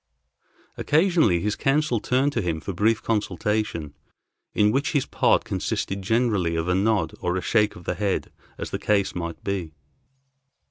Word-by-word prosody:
Occasionally 155 - +3
his 105 +1 -1
counsel 135 -3 +1
turned 130 +6 +1
to 115 - 0
him 85 -4 -2
for 95 - -5
brief 110 +5 +1
consultation, 105 -6 -1 0.6
in 105 0 +3
which 140 +4 0
his 145 -4 +1
part - - +2
consisted 95 +1 -3
generally 105 -5 +1
of 80 +1 -1
a 90 - +2
nod 95 -4 +1
or 90 +1 -1
a - - -2
shake 105 0 +2
of 90 - -12
the - - -2
head 95 +1 -2 0.3
as - - -6
the - - -3
case 100 -2 +1
might 85 -2 -5
be. 90 -6 -3
105 Hz, 160 wpm, -24 LUFS, 90-115 Hz, 0.6 s, Occasionally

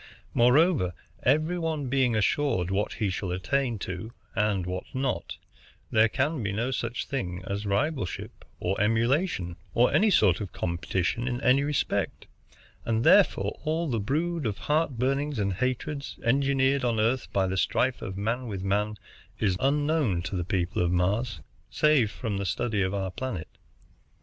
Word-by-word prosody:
Moreover, 125 - +4 0.3
every 155 +7 +2
one 160 -4 -2
being 130 -2 +2
assured 110 -4 +1
what 100 +2 0
he 100 -3 -1
shall 95 0 -3
attain 120 +7 0
to 95 +5 -6 0.2
and 105 -4 +1
what 90 0 -4
not, 130 0 -2 0.5
there 110 0 +5
can 140 +4 0
be 100 -2 -1
no 115 +6 -1
such 120 -2 -2
thing 90 -9 -4
as 100 +2 -3
rivalship, 105 - -2 0.2
or 95 +3 -1
emulation, 115 - +1 0.2
or 120 +1 +4
any 215 - +4
sort 100 - +4
of 100 - -5
competition 90 +6 -1
in 125 -2 -1
any 130 +3 +4
respect; 145 -1 -1 0.6
and 115 0 0
therefore - - +4
all 160 +2 0
the 120 -5 0
brood 155 +6 -1
of 105 - -3
heart 150 -4 0
burnings 135 +3 0
and 100 -2 0
hatreds, 130 +6 -3
engendered 135 +1 +2
on 120 -3 +1
Earth 120 +4 0
by 95 -1 +2
the 95 0 -1
strife 125 +6 +1
of 95 -2 -5
man 115 +5 -1
with 100 -4 -4
man, 105 +2 0 0.4
is 95 -4 +1
unknown 145 - +1
to 95 +2 -4
the 90 - -1
people 90 0 -1
of 85 0 +1
Mars, 100 +7 0 0.3
save 150 -8 +3
from 100 +1 -4
the 100 - -2
study 105 +2 0
of 95 +1 0
our 95 -2 -2
planet. 100 -5 -5
115 Hz, 160 wpm, -27 LUFS, 95-135 Hz, 0.6 s, there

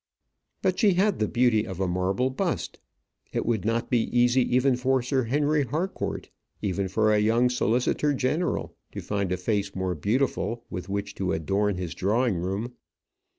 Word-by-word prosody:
But 185 -2 +1
she 205 -3 +5
had 200 +2 +2
the 105 - +1
beauty 120 -2 +2
of 95 -2 -6
a 95 - +1
marble 95 +8 0
bust. 130 - -2 0.5
It - - -2
would 110 -4 0
not 115 +1 -1
be 120 -3 +3
easy 125 +1 +4
even 130 0 +3
for 130 0 +1
Sir 130 0 0
Henry 145 +4 +1
Harcourt, 160 +9 -3 0.3
even 100 -1 -1
for 110 +3 +2
a 105 - +4
young 115 +4 +3
solicitor 125 +4 +1
general, 145 +6 -1 0.2
to - - -5
find 100 -3 -2
a 90 - 0
face 100 +1 -1
more 95 -1 -1
beautiful 115 - -1
with 90 +2 -6
which 100 0 -3
to 95 - 0
adorn 100 +5 0
his 90 -3 -4
drawing 105 +4 +1
room. 95 +8 -3
115 Hz, 170 wpm, -26 LUFS, 95-130 Hz, 0.5 s, she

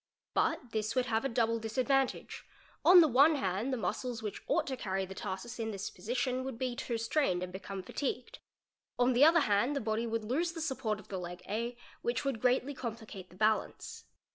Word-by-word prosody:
But 245 - 0
this 215 +1 -1
would 255 -1 +2
have 225 -2 0
a - - +1
double 230 -1 +1
disadvantage; 255 +4 0 0.4
on 360 0 +9
the 320 - +6
one 285 +4 +6
hand 200 +1 -1
the 260 - 0
muscles 230 +1 -3
which 210 - -4
ought - - +2
to 265 - -3
carry 190 -5 -2
the 190 - -8
tarsus 190 +6 -5
in 225 -1 -2
this 200 -1 -4
position 255 +2 -2
would 265 -3 -5
be 255 -1 -2
too 240 -2 -2
strained 225 - +1
and 180 0 -6
become 190 0 -6
fatigued; 255 +4 -4 0.6
on 245 +1 +3
the 245 +4 +5
other 330 +2 +7
hand 215 +5 +2
the - - +1
body 220 0 -1
would 230 -1 -2
lose 320 +10 0
the 335 - -6
support 265 -9 -1
of 210 - -15
the 190 - -3
leg 180 0 -7
A, 235 +4 -2 0.2
which 240 +4 -1
would 265 -6 -1
greatly 255 +3 +2
complicate 220 -7 -7
the - - -16
balance. 215 +2 -1
235 Hz, 205 wpm, -32 LUFS, 215-260 Hz, 0.6 s, on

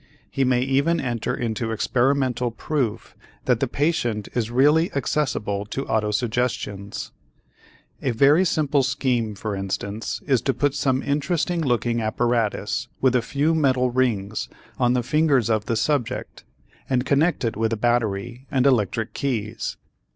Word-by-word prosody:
He 135 - +1
may 125 -1 +2
even 140 +6 +2
enter 120 -5 -2
into 115 -1 -2
experimental 125 +1 +1
proof 120 -2 -3 0.3
that 125 -3 +2
the 135 - +1
patient 120 -7 -1
is 115 -3 -1
really 150 +7 +3
accessible 120 -8 -1
to 135 +6 -4
autosuggestions. 105 -2 -2 0.9
A 135 - 0
very 140 +8 +5
simple 150 -5 +2
scheme 125 -5 0
for 105 +1 -4
instance 100 +2 -3
is 130 -5 +2
to 135 +1 0
put 145 -2 +1
some 130 -2 0
interesting 165 +4 0
looking 120 -4 0
apparatus 110 -2 0
with 130 -1 +3
a 125 - +4
few 145 +7 0
metal 130 -5 +2
rings 110 -5 0 0.3
on 125 -1 +3
the 125 -1 +1
fingers 140 -4 +2
of 110 -1 +1
the 115 - 0
subject 135 0 -2 0.4
and 130 -1 +1
connect 145 0 +2
it 115 - -1
with 110 +1 0
a 115 - 0
battery 120 +2 -1
and 130 -1 +1
electric 115 -3 +1
keys. 115 -6 -3
125 Hz, 145 wpm, -23 LUFS, 110-140 Hz, 0.9 s, very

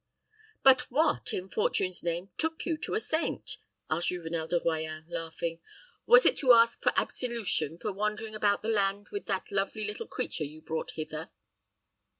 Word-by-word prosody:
"But 265 -1 +6
what, 300 +5 +1
in 185 - -3
Fortune's 185 -2 0
name, 175 +3 -2
took 320 0 0
you 335 - 0
to 310 - -3
a - - +2
saint?" 325 -6 -1 0.3
asked 170 +2 0
Juvenel 165 -2 -3
de 175 +1 +1
Royans, 160 -1 -2
laughing 165 0 -4 0.5
"Was - - +8
it - - +4
to 255 -4 +6
ask 230 0 +5
for - - +3
absolution 210 - -1
for 185 - -3
wandering 210 +2 -2
about 205 -1 +1
the 220 - -2
land 200 -1 +1
with 405 - -5
that 195 0 -2
lovely 200 +2 -1
little 210 0 -5
creature 155 - -2
you 150 +2 -7
brought 160 0 -4
hither?" 155 0 -5
195 Hz, 165 wpm, -29 LUFS, 165-230 Hz, 0.5 s, Was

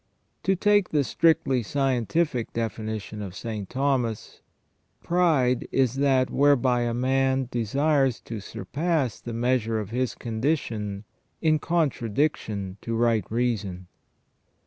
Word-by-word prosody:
To 195 - +3
take 205 0 +3
the 150 -2 +2
strictly 160 -3 +2
scientific 135 +2 0
definition 110 -1 -4
of 95 -3 -7
St. 105 -4 -5
Thomas: 130 -4 -1 0.3
" - - -42
Pride 155 -8 +2
is 130 -3 +2
that 135 -2 +2
whereby 135 -3 +3
a 120 -1 0
man 130 +1 +1
desires 135 +3 +1
to 115 -2 -6
surpass 140 - -2
the 120 - -7
measure 115 -1 0
of 105 -1 -6
his 125 +1 -1
condition 110 -5 -2 0.4
in 155 -2 +2
contradiction 120 - -1
to 115 - -3
right 115 -2 +1
reason 105 -7 -2
125 Hz, 120 wpm, -26 LUFS, 110-140 Hz, 0.4 s, To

